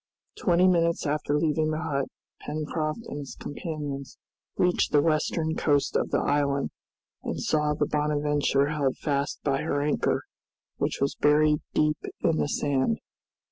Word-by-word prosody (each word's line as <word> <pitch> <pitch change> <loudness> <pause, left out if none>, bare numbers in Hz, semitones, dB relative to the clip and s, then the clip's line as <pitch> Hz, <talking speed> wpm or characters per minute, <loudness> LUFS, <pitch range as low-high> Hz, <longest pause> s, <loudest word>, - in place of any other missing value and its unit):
Twenty 180 0 +3
minutes 170 -2 +2
after 145 0 0
leaving 155 0 +1
the 155 +2 -2
hut 140 -2 -1 0.4
Pencroft 155 +6 -3
and 145 - -6
his 140 -2 -7
companions 145 -4 -5 0.4
reached 180 0 +2
the 145 - +5
western 160 0 +1
coast 145 -3 +1
of - - +1
the - - +1
island, 140 -1 +1 0.5
and - - -4
saw 150 -1 +1
the 150 - +1
"Bonadventure" 150 -1 +1
held 145 -4 0
fast 140 -1 -1
by 135 -2 +1
her 145 - 0
anchor, 145 +1 +1 0.5
which - - -1
was 140 - +2
buried 150 0 +4 0.2
deep 150 0 +2 0.2
in 165 -2 +2
the - - +1
sand. 145 +10 +1
150 Hz, 145 wpm, -27 LUFS, 145-155 Hz, 0.5 s, the